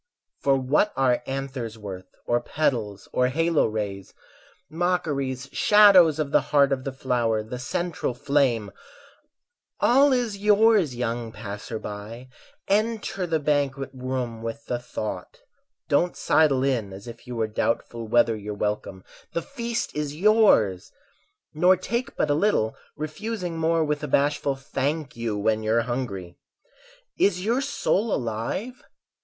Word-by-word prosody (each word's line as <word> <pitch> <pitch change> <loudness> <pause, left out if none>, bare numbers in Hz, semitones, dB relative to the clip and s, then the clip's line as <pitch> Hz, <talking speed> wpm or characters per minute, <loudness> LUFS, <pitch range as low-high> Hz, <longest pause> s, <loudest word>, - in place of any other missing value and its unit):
For 140 -1 +3
what 140 +10 +1
are 130 -2 +2
anthers 135 -4 -4
worth 95 -3 -8 0.2
or 120 0 +1
petals 115 -9 -2
Or 125 - +3
halo 165 +4 +2
rays? 100 -3 -5 0.5
Mockeries, 145 -6 -1
shadows 195 -7 +6
Of 150 -3 -2
the - - +4
heart 140 -2 +3
of 130 -1 -1
the 135 - -2
flower, 120 -4 0
the 125 +3 -7
central 140 +1 -2
flame 125 -7 +1 1.1
All 275 +4 +5
is 240 -6 0
yours, 210 - +4
young 120 -1 -3
passer 105 +1 -6
by; 110 +4 -8 0.4
Enter 210 -2 0
the 160 -1 +1
banquet 140 -2 0
room 125 -3 -4
with 115 +5 -6
the 120 - -2
thought; 105 -6 -6 0.5
Don't 175 +5 +1
sidle 145 -5 +3
in 120 -7 0
as 100 +4 -10
if 120 +1 -11
you 125 - -5
were 115 -1 0
doubtful 115 +1 -2
Whether 115 0 +3
you're 105 0 -6
welcome—the 105 - -4
feast 235 -4 -4
is 150 -1 -3
yours! 185 - +3 0.6
Nor 180 +4 +4
take 235 +7 -3
but - - +1
a - - +4
little, 150 - +1 0.2
refusing 175 +3 -4
more 165 0 +2
With 150 -1 -1
a - - -2
bashful 140 0 +1
"Thank 140 +2 -3
you", 115 -3 -2
when 110 +1 +1
you're 110 +2 +2
hungry. 100 -8 -5 0.8
Is 185 -1 +2
your 240 +5 +1
soul 230 -5 0
alive? 125 - -3
135 Hz, 140 wpm, -25 LUFS, 115-170 Hz, 1.1 s, shadows